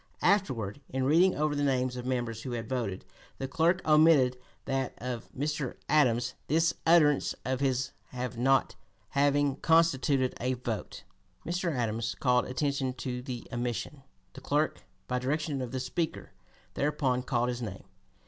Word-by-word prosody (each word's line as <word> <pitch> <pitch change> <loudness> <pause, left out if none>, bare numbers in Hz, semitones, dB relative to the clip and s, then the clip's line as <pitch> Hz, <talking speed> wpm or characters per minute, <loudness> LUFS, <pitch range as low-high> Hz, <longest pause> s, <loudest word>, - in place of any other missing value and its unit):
'" - - -26 0.2
Afterward, 120 - -6
in 130 0 -1
reading 170 +7 +4
over 150 0 +1
the 145 - -1
names 130 -3 +1
of 125 0 -5
members 120 -3 -2
who 125 - -5
had 115 -1 -4
voted, 115 -7 -3 0.3
the 135 - -3
clerk 165 +7 +1
omitted 150 -5 +5 0.3
that 135 -2 -1
of 125 -1 -5
Mr. 145 -1 -2
Adams, 125 -5 +3
this 165 +3 +3
utterance 155 -4 +4
of 130 0 -1
his 130 -1 0 0.4
not 135 +3 +2 0.3
having 145 0 +2
constituted 145 -5 +3
a 130 +2 +1
vote. 120 -4 -5 0.4
Mr. 175 +1 -1
Adams 115 -4 -1
called 125 -2 +2
attention 135 0 -1
to 125 0 -4
the 125 -2 -6
omission. 120 +4 -3 0.3
The 135 - -10
clerk, 145 +3 0 0.3
by 125 0 0
direction 145 +2 -1
of 125 -2 -4
the 130 - -2
Speaker, 155 +6 -3 0.4
thereupon 135 -3 0
called 125 -1 0
his 120 0 -3
name. 95 -5 -6
130 Hz, 150 wpm, -29 LUFS, 125-150 Hz, 0.4 s, omitted